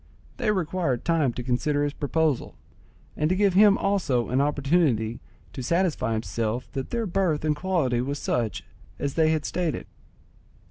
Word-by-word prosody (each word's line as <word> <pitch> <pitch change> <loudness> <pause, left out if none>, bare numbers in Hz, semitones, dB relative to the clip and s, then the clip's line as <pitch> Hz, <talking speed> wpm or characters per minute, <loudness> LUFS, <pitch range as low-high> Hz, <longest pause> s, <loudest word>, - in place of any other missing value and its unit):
They - - 0
required 175 - -1
time 160 -6 +2
to 125 - -5
consider 145 +4 0
his 145 -1 -1
proposal, 150 -2 -1 0.6
and 150 +1 0
to 185 - +2
give 200 -1 +3
him 200 +1 +6
also 165 -12 0
an 130 +2 +2
opportunity 140 -6 +1 0.3
to 130 - -5
satisfy 170 - 0
himself 115 +1 -3
that 135 -2 -4
their 235 -1 -1
birth 175 -5 0
and 150 -1 +2
quality 150 -8 0
was 140 +3 -2
such 110 - -2 0.3
as 140 -1 -2
they 160 -1 +3
had 155 -2 0
stated. 175 -4 -2
150 Hz, 155 wpm, -25 LUFS, 125-175 Hz, 0.6 s, him